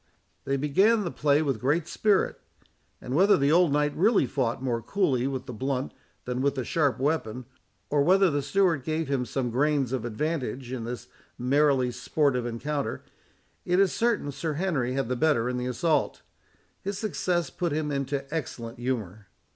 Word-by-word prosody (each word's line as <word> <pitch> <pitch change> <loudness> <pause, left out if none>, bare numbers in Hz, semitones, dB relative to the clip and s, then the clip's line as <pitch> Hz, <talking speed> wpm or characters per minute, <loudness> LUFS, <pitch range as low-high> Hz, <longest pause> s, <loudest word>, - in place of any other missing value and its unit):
They 135 0 0
began 195 +11 +3
the 175 - -3
play 145 +1 +2
with 135 -7 -1
great 150 +5 +1
spirit; 210 -3 +1 0.6
and 125 - -6
whether 195 +8 +5
the 140 +1 +2
old 170 -1 +4
knight 150 0 +1
really 200 - +3
fought 120 -2 -1
more 120 -3 -1
coolly 135 - 0
with 130 -2 -4
the 125 - -7
blunt 130 +3 -2 0.3
than 125 0 -2
with 140 0 +1
the 130 -3 -3
sharp 145 -2 +1
weapon, 130 -4 -1 0.5
or 145 -1 +3
whether 185 +3 +4
the 145 0 0
steward 165 -1 +1
gave 160 +2 -2
him 130 -3 0
some 125 0 -2
grains 135 0 +1
of 130 -3 -2
advantage 130 0 -3
in 125 -3 -4
this 120 -1 -6 0.3
merely 135 0 +2
sportive 125 0 0
encounter, 140 +5 -3 0.6
it 180 +1 +1
is 195 -2 +3
certain 230 -11 0
Sir 155 +3 -3
Henry 145 -7 -1
had 135 -2 -1
the 125 - -1
better 135 -4 +2
in 125 0 -2
the 125 0 -2
assault. 150 +6 0 0.6
His 200 0 -4
success 180 -5 -1
put 175 -3 -2
him 150 0 -1
into 140 0 -2
excellent 120 -6 -5
humour. 110 -5 -3
140 Hz, 175 wpm, -27 LUFS, 125-160 Hz, 0.6 s, whether